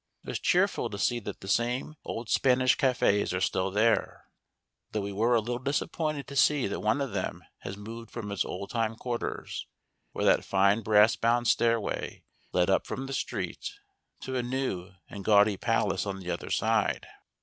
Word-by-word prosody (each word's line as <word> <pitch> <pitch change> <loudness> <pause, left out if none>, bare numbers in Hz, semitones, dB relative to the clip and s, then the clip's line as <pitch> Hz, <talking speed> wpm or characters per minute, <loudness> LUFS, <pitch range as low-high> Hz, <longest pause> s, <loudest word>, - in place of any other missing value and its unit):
It - - -9
was - - -2
cheerful 180 -9 +2
to 100 - -6
see 120 +4 +1
that 105 -3 -7
the 95 - -9
same 120 +7 0
old 115 0 -5
Spanish 130 +1 +3
cafés 105 -8 +2
are - - -1
still 95 0 0
there, 110 +4 +1 0.7
though 105 - 0
we 100 0 -4
were 115 +5 +2
a - - +5
little 120 +2 -3
disappointed 145 +1 -1
to 140 - -9
see 145 0 +4
that 100 - -2
one 110 +7 +1
of 135 -6 -3
them 100 - -3 0.2
has 100 - -7
moved 115 +2 -8
from 105 -4 -6
its 100 - 0
old 100 +2 -6
time 115 -1 0
quarters, 120 +1 -4 0.4
where - - -2
that - - +4
fine 100 +3 +3
brass 105 +1 +5
bound 120 +1 +1
stairway 115 -3 0 0.3
led 90 -1 +2
up 95 - +2
from 135 - -4
the 135 - -5
street, - - -3 0.5
to 130 - -4
a 125 - +1
new 120 -8 -2 0.2
and 100 - -8
gaudy 105 0 +5
palace 105 -3 0
on 95 -1 -3
the 90 -2 -4
other - - -4
side. - - +1
115 Hz, 185 wpm, -29 LUFS, 100-125 Hz, 0.7 s, a